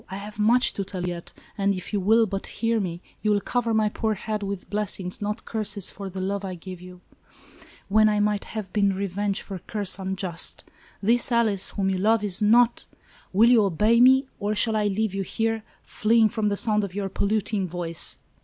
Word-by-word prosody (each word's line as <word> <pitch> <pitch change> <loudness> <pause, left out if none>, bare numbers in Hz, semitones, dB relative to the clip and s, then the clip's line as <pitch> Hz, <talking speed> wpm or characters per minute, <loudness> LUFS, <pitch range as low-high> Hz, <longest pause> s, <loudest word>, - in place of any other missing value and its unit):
I 190 - -5
have 210 +1 -9
much 235 +4 +3
to 200 - -3
tell 185 -2 -6
you 175 - -2
yet, 170 0 -10 0.3
and 200 0 +2
if 185 +3 -7
you 205 - +1
will 220 +4 +4
but 195 -1 -4
hear 230 0 -1
me, 175 -3 -4 0.2
you 215 - 0
will 205 -1 +3
cover 235 +3 -1
my 220 -1 +2
poor 215 +1 -1
head 215 +1 -4
with 200 -2 -5
blessings, 205 -3 +1
not 210 +2 -3
curses, 210 -3 -2
for 195 -1 -7
the 190 +1 -7
love 200 +1 -2
I 185 -2 -4
give 180 +1 -9
you, 180 0 -12 0.9
when 215 +2 +4
I 210 0 +1
might 210 -1 0
have 210 -4 -7
been 200 -2 +2
revenged 200 +1 -2
for 195 -2 -7
curse 200 0 -2
un 190 0 -3
just. 180 -3 -2 0.4
This 235 +4 +2
Alice 220 -5 +2
whom 195 -2 -1
you 190 - -1
love 220 +2 +2
is 200 -1 0
not 230 +3 +3
— - - -28
" - - -29
"Will 225 +5 +5
you 230 -4 +6
obey 210 +5 +3
me, 265 +2 +6
or 205 +1 -1
shall 220 +1 +2
I 210 -1 +1
leave 205 0 -1
you 195 - -2
here, 225 +3 -1 0.2
fleeing 220 0 +2
from 215 -1 -1
the 200 - -1
sound 210 -1 +2
of 195 -2 -5
your 200 -1 -2
polluting 200 0 -1
voice?" 170 -1 -1
205 Hz, 220 wpm, -25 LUFS, 190-220 Hz, 0.9 s, you